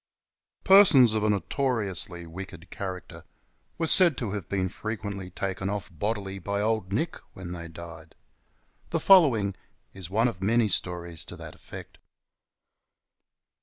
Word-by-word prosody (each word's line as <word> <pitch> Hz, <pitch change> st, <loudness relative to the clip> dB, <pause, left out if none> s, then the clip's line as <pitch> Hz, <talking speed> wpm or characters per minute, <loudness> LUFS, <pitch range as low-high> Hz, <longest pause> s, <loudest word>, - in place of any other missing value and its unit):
EESONS 165 Hz, -, +8 dB
of 110 Hz, -1 st, 0 dB
a 110 Hz, -, +2 dB
notoriously 100 Hz, -, -1 dB
wicked 85 Hz, 0 st, -10 dB
character 95 Hz, -2 st, -7 dB, 0.5 s
were 165 Hz, -, 0 dB
said 170 Hz, -2 st, +5 dB
to 115 Hz, -6 st, -3 dB
have 100 Hz, -4 st, -5 dB
been 95 Hz, -2 st, 0 dB
frequently 100 Hz, -2 st, -5 dB
taken 95 Hz, +1 st, -3 dB
off 100 Hz, -2 st, -4 dB
bodily 100 Hz, +2 st, -3 dB
by 100 Hz, +2 st, -2 dB
Old 110 Hz, -3 st, -1 dB
Nick 155 Hz, +12 st, -1 dB, 0.2 s
when 90 Hz, -2 st, -8 dB
they 85 Hz, -1 st, -6 dB
died. 80 Hz, -1 st, -11 dB, 0.7 s
The -, -, 0 dB
following 130 Hz, -, +5 dB, 0.4 s
is 95 Hz, -3 st, -7 dB
one 110 Hz, +5 st, +2 dB
of 95 Hz, -7 st, -5 dB
many 110 Hz, +2 st, +2 dB
stories 85 Hz, -3 st, -1 dB
to -, -, -7 dB
that -, -, -9 dB
effect. -, -, -11 dB
100 Hz, 135 wpm, -27 LUFS, 90-115 Hz, 0.7 s, EESONS